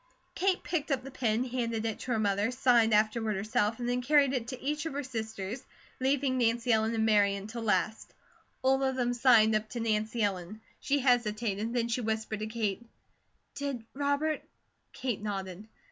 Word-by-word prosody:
Kate 375 0 +1
picked 315 -4 -2
up 270 -3 0
the 270 - -8
pen, 230 -2 0
handed 235 -3 -2
it 220 -2 -2
to 255 - -5
her 235 - +2
mother, 205 0 +1
signed 245 -3 +3
afterward 215 0 +2
herself, 210 +2 0
and 240 - -3
then 245 +1 0
carried 280 0 +4
it 240 -3 -2
to 255 0 -6
each 295 +3 -2
of 320 - -5
her 285 +1 -3
sisters, 220 -2 -5 0.4
leaving 265 0 +1
Nancy 235 0 +2
Ellen 220 +1 +1
and 220 0 +1
Mary 205 -2 +4
until 215 +4 -6
last. 215 0 0 0.5
All 265 +1 +3
of 265 -1 +1
them 245 -1 0
signed 235 -3 +5
up 215 0 0
to 240 - -5
Nancy 220 0 0
Ellen. 195 +1 -2 0.2
She 285 +1 +1
hesitated, 230 -3 +1
and 235 0 0
she 245 - 0
whispered 220 -1 -2
to 215 - -3
Kate: 220 -1 -2 0.7
"Did 280 -5 -4
Robert 285 +2 0 0.3
?" - - -47
Kate 250 -5 -3
nodded. 195 -1 -5
230 Hz, 185 wpm, -30 LUFS, 215-260 Hz, 0.7 s, signed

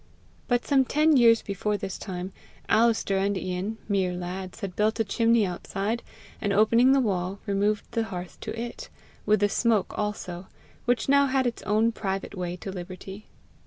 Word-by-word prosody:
But 245 -1 +1
some 275 -2 +4
ten 305 +4 +3
years 230 -3 +6
before 205 +1 -2
this 190 - -5
time, 185 -1 -5 0.3
Alister 225 -4 +3
and 200 0 0
Ian, 185 +4 -3
mere 190 -3 +1
lads, 180 +1 -6
had 190 -3 -5
built 215 +2 +1
a - - +4
chimney 230 +1 +3
outside, 195 +5 -3 0.4
and 205 - 0
opening 230 +5 +5
the 275 - +5
wall, 190 -5 -1
removed 205 +1 0
the 230 -1 0
hearth 180 -3 -7
to 225 - -5
it 235 0 -6 0.4
with 210 -1 +4
the 205 - +5
smoke 220 -1 +1
also, 190 -4 -4 0.4
which 245 0 +1
now 280 0 +5
had 265 -1 +1
its 240 - -2
own 215 +3 +3
private 195 -3 -4
way 180 -2 -3
to 190 +2 -7
liberty. 190 +2 -8
205 Hz, 170 wpm, -26 LUFS, 190-230 Hz, 0.4 s, years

